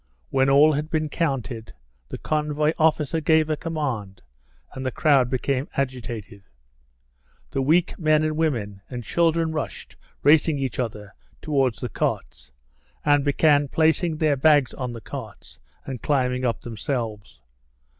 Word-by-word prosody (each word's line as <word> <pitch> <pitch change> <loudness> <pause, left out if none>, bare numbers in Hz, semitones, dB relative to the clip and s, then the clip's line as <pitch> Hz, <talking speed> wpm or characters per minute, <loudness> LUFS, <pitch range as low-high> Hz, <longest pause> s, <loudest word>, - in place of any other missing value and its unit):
When 135 0 +3
all 145 +3 +6
had 150 +2 -2
been 155 -2 -1
counted, 125 -9 -3 0.4
the - - -5
convoy 150 0 0
officer 160 0 +2
gave 160 0 +3
a - - +2
command, 130 - -4 0.5
and 130 - -6
the 130 - 0
crowd 135 -2 +3
became 130 +1 -1
agitated. 120 -6 -4 1.1
The 135 - -1
weak 160 +6 +2
men 155 -2 +3
and 155 0 -1
women 115 -11 -1
and 125 -2 -6
children 165 +5 +1
rushed, 155 -1 -5 0.3
racing 150 +1 +4
each 135 -4 -3
other, 105 -5 -4 0.3
towards 135 -6 0
the 125 - -3
carts, - - -3 0.5
and 145 -1 +4
began 145 0 +3
placing 160 +2 +1
their 155 -2 +2
bags 145 -1 +4
on 125 -2 -4
the 115 - -8
carts - - -9 0.3
and 130 -4 -6
climbing 125 -3 0
up 115 - -1
themselves. 115 - -5
140 Hz, 140 wpm, -24 LUFS, 125-155 Hz, 1.1 s, all